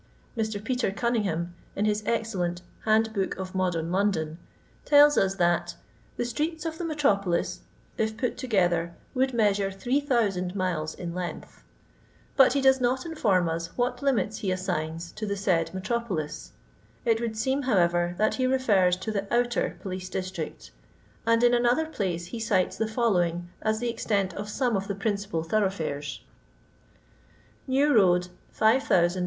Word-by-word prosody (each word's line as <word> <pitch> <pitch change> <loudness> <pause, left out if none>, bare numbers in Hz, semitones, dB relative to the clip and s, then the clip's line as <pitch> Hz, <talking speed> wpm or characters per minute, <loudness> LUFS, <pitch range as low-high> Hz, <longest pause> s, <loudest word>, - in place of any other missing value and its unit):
Mr. 220 -2 -2
Peter 250 -1 0
Guniiinghmn, 200 -6 -1 0.3
in 205 - 0
his 210 0 +1
excellent 185 -6 -1
" - - -25
Hand 220 0 +3
book 195 -3 -1
of 185 -1 -6
Modem 175 -3 -1
London, 180 -5 0 0.4
tells 290 0 +6
ns 195 0 +2
that 175 -2 +1 0.4
"the 240 - -1
streets 305 +7 -2
of 320 -1 -4
the - - -3
Metropolis, 200 - 0 0.4
if 220 0 0
pnt 250 - -1
together, 175 -9 0 0.2
would 265 0 +1
measure 205 -4 +2
3000 205 -5 0
miles 175 -5 -2
in 170 -2 -5
length 180 -1 -6 0.4
;" - - -32
but 265 -3 +6
he 280 - +1
does 265 -1 +4
not 255 +3 +1
inform 210 - +1
us 165 +1 -4
what 245 0 0
limits 245 -6 0
he 195 - -1
assigns 170 -3 -3
to 215 0 -5
the 200 0 -2
said 180 -4 +1
metropolis; 190 -6 -3 0.5
it 230 -1 +2
would 225 -2 -3
seem, 265 +5 0
however, 175 -7 +2
that 215 +2 +2
he 255 - +3
refers 205 -9 +3
to 190 +4 -4
the 200 -1 -3
Outer 240 0 +1
Police 185 -2 -5
District: 185 +1 -5 0.6
and 230 +1 +4
in 240 0 +5
an 240 0 +3
other 300 +7 +3
place 185 - -3
he 235 - -3
cites 220 -5 +1
the 220 - -1
following 175 -7 0
as 220 0 +1
the 240 +2 -2
extent 200 -5 -1
of 205 +3 -6
some 245 +1 0
of 195 0 -2
the 200 - -2
principal 200 -4 -2
thoroughfares: 165 -7 -1 0.7
— - - -32
New 290 +1 +4
road 180 -4 +4
205 Hz, 160 wpm, -27 LUFS, 180-240 Hz, 0.7 s, tells